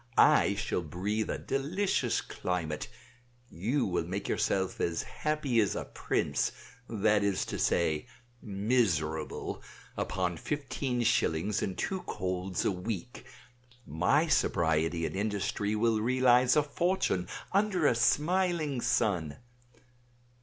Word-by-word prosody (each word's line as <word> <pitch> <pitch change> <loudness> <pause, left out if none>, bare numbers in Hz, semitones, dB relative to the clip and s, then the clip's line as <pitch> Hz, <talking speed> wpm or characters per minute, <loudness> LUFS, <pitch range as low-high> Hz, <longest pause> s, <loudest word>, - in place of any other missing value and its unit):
I - - +5
shall - - -1
breathe 95 +7 -2
a - - -1
delicious 160 +9 0
climate; 85 -4 -3 0.6
you 120 - 0
will 90 -3 0
make 95 +4 -4
yourself 95 -1 0
as 85 -1 0
happy 150 -6 -1
as 105 - +2
a - - -3
prince, - - -1 0.4
that 105 -1 +2
is 100 -2 0
to - - -5
say, 80 -3 +1 0.3
miserable, 95 -8 -1 0.3
upon 90 -2 -1
fifteen 130 - -2
shillings 105 -2 +1
and 95 - -3
two 190 -1 -2
colds 90 -1 -3
a - - +3
week; 95 +5 -5 0.6
my 90 - +2
sobriety 80 - +1
and - - -4
industry 105 +1 -1
will 110 0 +2
realize 125 +1 +4
a 150 - +4
fortune 160 - 0 0.3
under 195 -4 +2
a 145 - +5
smiling 155 +2 +1
sun. 90 -11 0
105 Hz, 120 wpm, -30 LUFS, 90-130 Hz, 0.6 s, I